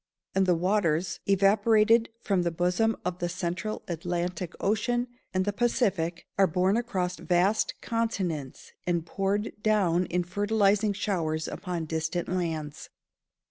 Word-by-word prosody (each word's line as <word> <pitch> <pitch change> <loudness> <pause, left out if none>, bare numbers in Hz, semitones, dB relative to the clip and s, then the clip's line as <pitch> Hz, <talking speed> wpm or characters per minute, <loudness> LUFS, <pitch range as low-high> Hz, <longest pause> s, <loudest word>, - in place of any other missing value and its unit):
And 190 0 +2
the 180 - +4
waters, 175 -2 +1
evaporated 215 +3 +4
from 195 -3 +1
the 175 - +1
bosom 180 +6 +1
of 180 0 -2
the 175 - -1
central 180 +4 -3
Atlantic 175 +1 -3
Ocean 240 +4 0 0.2
and 185 0 0
the 205 - 0
Pacific, 200 -8 0
are 195 - +6
borne 185 +4 +2
across 190 -7 -1
vast 185 +4 +1
continents, 190 - -2 0.2
and 170 -2 0
poured 200 +4 -1
down 185 -5 +2
in 180 +1 0
fertilising 205 +2 +2
showers 165 -6 -1
upon 175 -4 -4
distant 160 +2 -2
lands. 160 -5 -3
185 Hz, 130 wpm, -28 LUFS, 175-210 Hz, 0.2 s, are